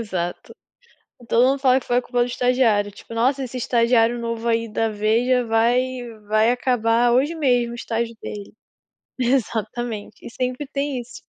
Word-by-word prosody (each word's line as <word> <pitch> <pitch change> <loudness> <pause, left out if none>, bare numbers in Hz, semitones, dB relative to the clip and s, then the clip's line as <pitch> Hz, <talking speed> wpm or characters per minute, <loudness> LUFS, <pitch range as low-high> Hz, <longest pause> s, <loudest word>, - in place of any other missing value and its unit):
Exato, 180 -5 -4 0.8
todo 235 +2 +4
mundo 275 0 0
fala 260 -1 +4
que - - -17
foi 245 +1 +2
culpa 245 0 -3
do 240 - +4
estagiário, 245 -5 +1
tipo: 230 - -12
"Nossa, 265 +4 +1
esse 255 0 -7
estagiário 235 -1 +2
novo 230 0 -4
aí 230 0 +1
da 225 +1 0
Veja 230 +4 +1
vai 230 +2 +3 0.5
vai 215 +2 +3
acabar 240 -1 +2
hoje 275 +6 +2
mesmo 245 -6 +1
o - - -6
estágio 230 0 -3
dele". 205 -1 -8 0.7
Exatamente, 235 -3 -2
e - - -6
sempre 255 +3 -3
tem 280 -2 -2
isso. 240 +1 -12
235 Hz, 160 wpm, -22 LUFS, 225-250 Hz, 0.8 s, todo